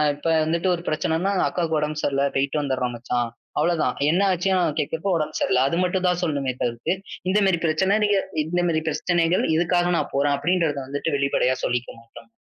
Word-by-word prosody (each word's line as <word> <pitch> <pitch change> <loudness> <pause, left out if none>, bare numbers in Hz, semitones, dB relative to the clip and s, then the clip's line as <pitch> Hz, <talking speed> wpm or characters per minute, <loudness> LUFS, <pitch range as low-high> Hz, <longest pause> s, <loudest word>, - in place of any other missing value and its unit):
இப்ப 145 - -18 0.2
வந்துட்டு 170 +3 0
ஒரு 170 - -8
பிரச்சனைன்னா, 160 +5 0 0.2
அக்காவுக்கு 165 -3 -1
உடம்பு 150 0 -2
சரியில்ல, 140 0 +1
போய்ட்டு 140 +2 0
வந்தறேன் 130 -3 -2
மச்சான். 120 0 -2 0.3
அவ்ளோதான். 170 -2 +1 0.2
என்ன 180 - +2
ஆச்சுன்னு 180 -3 +1
கேட்கிறப்போ, 165 +6 -2
உடம்பு 155 0 -3
சரியில்ல. 130 0 +2
அது 170 - -1
மட்டும்தான் 180 -1 0
சொல்லணும்மே 140 -5 -1
தவிர்த்து, 120 +7 -1 0.4
இந்த 200 - +2
மாரி 175 -3 +2
பிரச்சனை 190 +6 +2
நீங்க 205 -1 +3 0.3
இந்த 175 +3 -1
மாரி 160 -1 +1
பிரச்சனைகள் 170 +3 +1
இதுக்காக 175 +1 +2
நான் - - -2
போறேன் 140 0 +2
அப்படிங்கிறதை 165 -3 0
வந்துட்டு 145 +2 -2
வெளிப்படையா 140 -2 +1
சொல்லிக்க 125 0 -1
மாட்டாங்க. 115 0 -15
155 Hz, 170 wpm, -23 LUFS, 140-175 Hz, 0.4 s, நீங்க